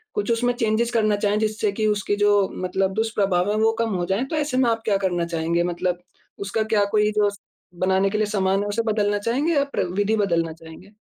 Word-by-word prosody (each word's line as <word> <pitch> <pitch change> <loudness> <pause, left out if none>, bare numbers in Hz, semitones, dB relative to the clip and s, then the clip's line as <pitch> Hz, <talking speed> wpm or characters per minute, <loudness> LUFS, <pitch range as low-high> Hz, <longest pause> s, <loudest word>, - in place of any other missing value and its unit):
कुछ 415 - -1
उसमें 245 +1 +1
चेंजेज़ 230 0 0
करना 215 -2 +2
चाहें 205 +1 0
जिससे 215 -1 0
कि 215 +1 0
उसकी 205 -1 0
जो 205 -1 +3 0.2
मतलब 190 +1 0
दुष्प्रभाव 200 -4 0
है 210 - 0
वो 220 +1 +3
कम 230 -1 0
हो 175 - -1
जाए, 195 +6 0
तो 310 - -4
ऐसे 290 -4 -1
में 255 -2 +3
आप 225 0 -2
क्या 205 -2 +2
करना 175 -2 0
चाहेंगे? 170 0 -1
मतलब 175 0 -2 0.4
उसका 200 +3 -1
क्या 205 -1 +4
कोई 210 0 +3
जो 210 -1 +3
स 200 - -12 0.5
बनाने 190 +1 +2
के 215 - -2
लिए 215 - +2
सामान 195 -2 +1
है, - - -4
उसे 215 +3 0
बदलना 205 -1 +1
चाहेंगे 265 +10 0
या 280 -1 +3
प्र - - 0
विधि 205 +2 +1
बदलना 170 -5 0
चाहेंगे? 165 +4 -14
205 Hz, 230 wpm, -23 LUFS, 190-225 Hz, 0.5 s, क्या